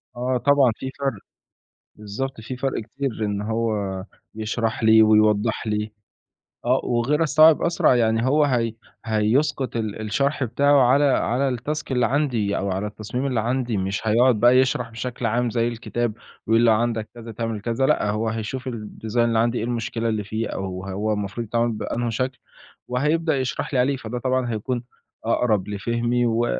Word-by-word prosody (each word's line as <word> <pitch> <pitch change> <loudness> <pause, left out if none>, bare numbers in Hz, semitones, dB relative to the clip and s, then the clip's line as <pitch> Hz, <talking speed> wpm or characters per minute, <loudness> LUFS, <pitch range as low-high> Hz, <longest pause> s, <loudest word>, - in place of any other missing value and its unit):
آه، 125 +1 0
طبعًا 140 -2 +4
في 130 - -6
فَرْق، 135 -2 0 0.8
بالضبط، 105 +4 -5
في 125 +3 -6
فَرْق 135 -1 -2
كتير 115 -1 -4
إن 100 -1 -2
هو 115 +1 -1 0.6
يشرح 110 +1 -2
لي 110 0 +7
ويوضّح 110 +1 +3
لي 105 0 -2 0.7
آه 125 +2 +2
وغير 125 +7 +1
الصعب 155 0 +5
أسرع 170 -6 +3
يعني 115 0 +2
هو 150 +3 +3
هي 120 -5 +1 0.3
هيسقُط 120 +5 +1
ال 110 -1 -3
الشرح 140 +6 0
بتاعه 140 +4 +3
على 140 +3 +4
على 135 0 +1
التاسك 140 +4 -4
اللي 125 -2 +2
عندي 120 -7 0
أو 100 0 -2
على 95 +3 -2
التصميم 110 +5 -5
اللي 125 -4 0
عندي، 120 -1 -1
مش 95 +3 -2
هيقعد 120 +1 +4
بقى 120 +2 +6
يشرح 125 -2 +1
بشكل 120 +1 -5
عام 120 +2 +1
زي 115 0 0
الكتاب، 120 -1 -2 0.3
يقول 115 +1 +4
لو 115 - +6
عندك 115 -1 -1
كذا 115 -1 -9
تعمل 115 -1 -4
كذا 120 +4 0
لأ، 105 - +2
هو 110 +2 -1
هيشوف 120 +4 -4
الdesign 110 0 -7
اللي 115 -1 +3
عندي 120 +1 +1
إيه - - -2
المشكلة 115 -1 -2
اللي 110 -2 -1
فيه 110 +2 -3
أو 95 -1 -5
هو 105 +3 -1
المفروض 105 +3 -4
يتعمل 120 +1 +1
بأنهي 115 +2 -3
شكل، 130 +3 -2 0.5
وهيبدأ 150 +4 +1
يشرح 130 +2 -3
لي 125 - +2
عليه، 135 +2 +2
فده 120 0 -5
طبعًا 130 -1 0
هيكون 120 +3 -3 0.4
أقرب 110 -4 +1
لفهمي 120 +4 -1
و 115 0 +1
115 Hz, 170 wpm, -23 LUFS, 110-130 Hz, 0.8 s, لي